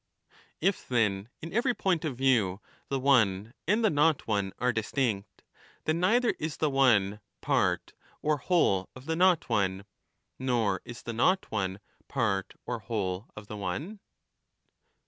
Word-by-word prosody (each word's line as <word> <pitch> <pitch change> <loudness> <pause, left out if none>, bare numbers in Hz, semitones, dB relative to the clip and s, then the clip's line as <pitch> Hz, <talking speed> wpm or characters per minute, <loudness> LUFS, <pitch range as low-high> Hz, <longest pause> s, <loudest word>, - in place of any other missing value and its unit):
the - - -52
one: - - -28
If 200 - -6
then, 105 -4 +1
in 165 - -6
every 240 +3 +2
point 180 -5 0
of 135 -6 -3
view, 115 -8 +2 0.3
the 135 - -1
one 115 -5 +3
and 215 +5 +3
the 210 - +4
not 150 0 +3
one 100 -3 0
are 125 0 +1
distinct, 110 -2 -2 0.4
then 160 +2 +1
neither 230 +7 +3
is 155 -1 -3
the 155 -2 +1
one 105 -7 +3 0.2
part - - 0 0.3
or 150 0 +1
whole 125 - +2
of 130 +1 -12
the 160 +1 -1
not 180 -1 +3
one, 100 -4 0 0.5
nor 120 -7 +1
is 120 -1 -9
the 115 - -4
not 185 +12 +2
one 95 -2 -2 0.3
part 110 -7 -1
or 120 -1 -3
whole 100 -4 -3
of 105 - -9
the 105 +1 -7
one 125 - -4
120 Hz, 160 wpm, -29 LUFS, 100-155 Hz, 0.5 s, the